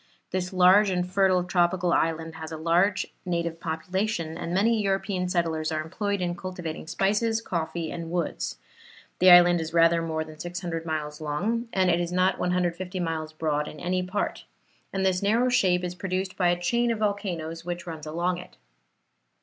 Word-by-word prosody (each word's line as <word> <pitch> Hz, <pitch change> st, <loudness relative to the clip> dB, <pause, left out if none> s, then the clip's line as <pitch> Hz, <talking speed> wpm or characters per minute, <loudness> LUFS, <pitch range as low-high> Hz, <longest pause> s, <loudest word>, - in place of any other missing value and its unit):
This 180 Hz, -1 st, -2 dB
large 190 Hz, +3 st, +6 dB
and 180 Hz, -1 st, 0 dB
fertile 185 Hz, -1 st, +3 dB
tropical 175 Hz, -1 st, +1 dB
island 165 Hz, 0 st, 0 dB
has 160 Hz, 0 st, -8 dB
a 160 Hz, -, -5 dB
large 175 Hz, +5 st, +2 dB, 0.2 s
native 170 Hz, -2 st, -2 dB
population, 170 Hz, +1 st, -2 dB
and 170 Hz, -, -5 dB
many 215 Hz, +5 st, +2 dB
European 195 Hz, -2 st, -1 dB
settlers 165 Hz, -3 st, 0 dB
are 155 Hz, -, -1 dB
employed 200 Hz, +5 st, -2 dB
in 175 Hz, -1 st, -1 dB
cultivating 175 Hz, -4 st, -6 dB
spices, 210 Hz, +6 st, +1 dB
coffee 165 Hz, -5 st, -3 dB
and 170 Hz, -1 st, -5 dB
woods. 155 Hz, -, -2 dB, 0.6 s
The 185 Hz, -, +7 dB
island 175 Hz, -1 st, +8 dB
is 160 Hz, +1 st, -5 dB
rather 165 Hz, 0 st, +5 dB
more 160 Hz, -1 st, -2 dB
than 155 Hz, -1 st, -13 dB
600 175 Hz, -1 st, -4 dB
miles 150 Hz, -1 st, -3 dB
long, 210 Hz, +11 st, -1 dB
and 185 Hz, -1 st, +3 dB
it 170 Hz, +1 st, +2 dB
is 175 Hz, 0 st, -3 dB
not 185 Hz, +1 st, +2 dB
150 180 Hz, +1 st, -1 dB
miles 160 Hz, -2 st, -2 dB
broad 150 Hz, -1 st, -1 dB
in 150 Hz, -, -9 dB
any 185 Hz, +1 st, 0 dB
part; 185 Hz, +3 st, -3 dB, 0.5 s
and 190 Hz, 0 st, -1 dB
this 185 Hz, -1 st, +2 dB
narrow 230 Hz, +5 st, +2 dB
shape 180 Hz, -7 st, +3 dB
is 180 Hz, 0 st, -3 dB
produced 185 Hz, +1 st, -3 dB
by 180 Hz, -2 st, +2 dB
a 175 Hz, 0 st, +1 dB
chain 235 Hz, +7 st, +1 dB
of 230 Hz, -, 0 dB
volcanoes 185 Hz, -6 st, -2 dB
which 175 Hz, 0 st, -5 dB
runs 160 Hz, -3 st, -7 dB
along 175 Hz, +3 st, -1 dB
it. 180 Hz, -, -13 dB
175 Hz, 175 wpm, -26 LUFS, 165-190 Hz, 0.6 s, island